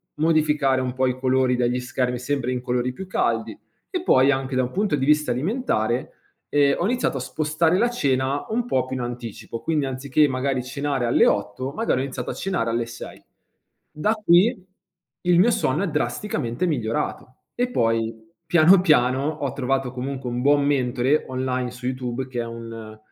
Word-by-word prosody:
modificare 150 -4 +2
un 125 -1 -2
po' 130 0 +1
i 125 0 -2
colori 130 -1 +2
degli 125 0 0
schermi 125 0 -2
sempre 130 -1 -2
in 125 -1 -2
colori 125 0 -1
più 190 - -7
caldi - - -1 0.4
e 355 - -1
poi 130 - +4
anche 130 0 -2
da 130 - +2
un 125 - -4
punto 200 -4 0
di 135 -1 -1
vista 150 -3 +3
alimentare 130 - -1 0.4
ehm, 140 -1 +3
ho 175 - +1
iniziato 240 - 0
a - - -3
spostare 155 +6 0
la 240 +3 +2
cena 140 - 0
un 235 +2 -1
po' 130 - 0
più 130 0 -4
in - - -3
anticipo, 120 -1 -6
quindi 150 0 0
anziché 135 +3 +1
magari 130 0 -1
cenare 140 -1 -2
alle 120 - +4
8:00, 105 +7 -1
magari 150 - 0
ho - - -1
iniziato 130 -2 -5
a - - -5
cenare 175 -12 -2
alle 115 0 0
6:00. 115 0 -10 0.7
Da 180 +9 0
qui 210 +1 +3 0.6
il 175 -1 +3
mio 225 +6 +5
sonno 155 +2 0
è - - 0
drasticamente 150 - -2
migliorato. 130 -1 -2 0.2
E 245 +1 0
poi 115 - +1 0.3
piano 175 +3 +6
piano 135 -4 +3
ho 145 -4 -3
trovato 135 -1 -1
comunque 130 0 -4
un 120 +1 -3
buon 145 +1 +3
mentore 130 +1 +1
online 130 -1 -2
su 125 0 -10
YouTube 130 0 -3
che 120 -2 -3
è - - -4
un 115 -2 -8
130 Hz, 180 wpm, -23 LUFS, 125-150 Hz, 0.7 s, piano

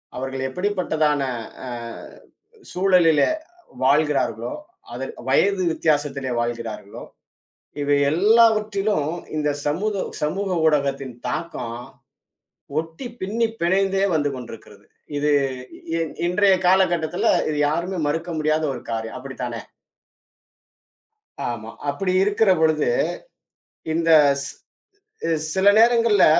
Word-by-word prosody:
அவர்கள் 130 +1 -4
எப்படிப்பட்டதான 160 -4 0 0.5
அ - - -5 1.0
சூழலிலே 180 -5 +4 0.5
வாழ்கிறார்களோ, 140 -5 +1 0.4
அது 130 +2 -4 0.2
வயது 190 +7 +3
வித்தியாசத்திலே 145 -4 0
வாழ்கிறார்களோ, 115 -3 -5 0.8
இவை 145 0 +2
எல்லாவற்றிலும் 210 -3 +3 0.2
இந்தச் 150 -1 -1
சமூத் 195 +8 -1 0.2
சமூக 190 +6 -1 0.2
ஊடகத்தின் 140 -4 0
தாக்கம் 125 -4 -4 1.0
ஒட்டிப் 165 +10 -7
பின்னிப் 225 +4 -1
பிணைந்தே 195 +2 +2
வந்து 145 -2 +1
கொண்டிருக்கிறது. 115 -4 -11 0.3
இது 145 +1 +1 1.0
இன்றைய 195 +2 +4
காலகட்டத்துல, 180 -4 +2 0.2
இது 150 - -2
யாருமே 170 +5 -2
மறுக்க 165 +4 -2
முடியாத 155 +1 +1
ஒரு 125 - -7
காரியம். 110 0 -4
அப்படித்தானே? 125 -3 -6 1.9
ஆமா, 115 -2 -6 0.2
அப்படி 185 +7 -1
இருக்கிறபொழுது, 185 -7 +3 1.1
இந்த 165 +1 +1 0.3
ச் - - -6 1.0
சில 190 +1 +2
நேரங்கள்ல 230 -3 +5
155 Hz, 85 wpm, -22 LUFS, 135-195 Hz, 1.9 s, நேரங்கள்ல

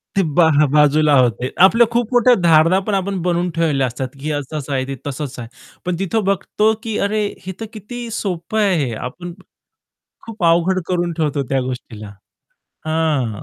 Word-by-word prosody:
ते 195 - +3
बा 175 - +7 0.3
बाजूला 150 0 +4
होते. 125 0 +1 0.2
आपल्या 230 +5 +5
खूप 235 -1 0
मोठ्या 245 0 +5
धारणा 165 +2 +5
पण 210 - 0
आपण 195 -1 -1
बनवून 175 0 0
ठेवल्या 150 -5 +1
असतात, 125 +2 -4
की 150 +3 -3
असं-असं 145 0 -4
आहे, 130 -1 -1
ते 135 - -4
तसं-तसं 140 -2 -5
आहे. 115 - -9 0.4
पण 180 0 -1
तिथं 200 +3 -1
बघतो 200 +3 +1
की 225 -3 -3
अरे 210 0 -1 0.2
हे 190 - -4
तर 225 - -4
किती 235 +3 -7
सोप्पं 195 -1 -3
आहे 200 -3 +3
हे, 120 - -4
आपण 170 +10 -7 0.9
खूप 220 -4 -7
अवघड 170 +3 +3
करून 175 -1 -1
ठेवतो 150 -3 -1
त्या 135 -1 +1
गोष्टीला. 115 -5 -7 0.7
हां. 150 -9 -1
165 Hz, 170 wpm, -19 LUFS, 140-195 Hz, 0.9 s, बा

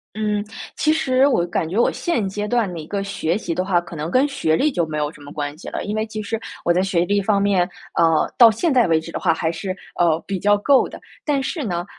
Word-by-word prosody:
嗯。 210 -1 -1 0.3
其 310 - +2
实 265 -3 +3
我 255 -11 +2
感 170 -2 -2
觉 190 +6 -2
我 235 - +4
现 290 - -1
阶 205 +2 -3
段 220 -4 0
的 170 - -6
一 155 - -9
个 200 +2 -3
学 195 -3 -1
习 175 -6 -3
的 185 - -1
话， 185 -2 +2
可 170 -1 -10
能 155 +2 -4
跟 255 +6 +3
学 275 - 0
历 300 - +2
就 175 - 0
没 155 - -5
有 150 -1 -1
什 - - -17
么 145 0 -11
关 145 0 -4
系 - - -9
了。 - - -4
因 205 - -3
为 215 0 -1
其 215 -1 -5
实 225 +2 -3 0.3
我 170 - +4
在 180 +2 +2
学 185 -3 +1
历 205 +2 +1
方 200 0 +1
面， 190 -3 +2 0.3
呃， 165 -2 +3
到 235 -3 +9
现 295 - 0
在 245 -5 +4
为 160 -1 +2
止 165 - -9
的 - - -3
话 - - +2
还 160 0 -1
是， 185 +3 -4 0.2
呃， 165 -2 +3
比 195 -1 -2
较 205 +3 +3
够 265 +6 +3
的。 - - -11 0.2
但 285 -3 +1
是 295 +2 -3
呢， 175 -5 -2
195 Hz, 290 characters per minute, -21 LUFS, 170-225 Hz, 0.3 s, 到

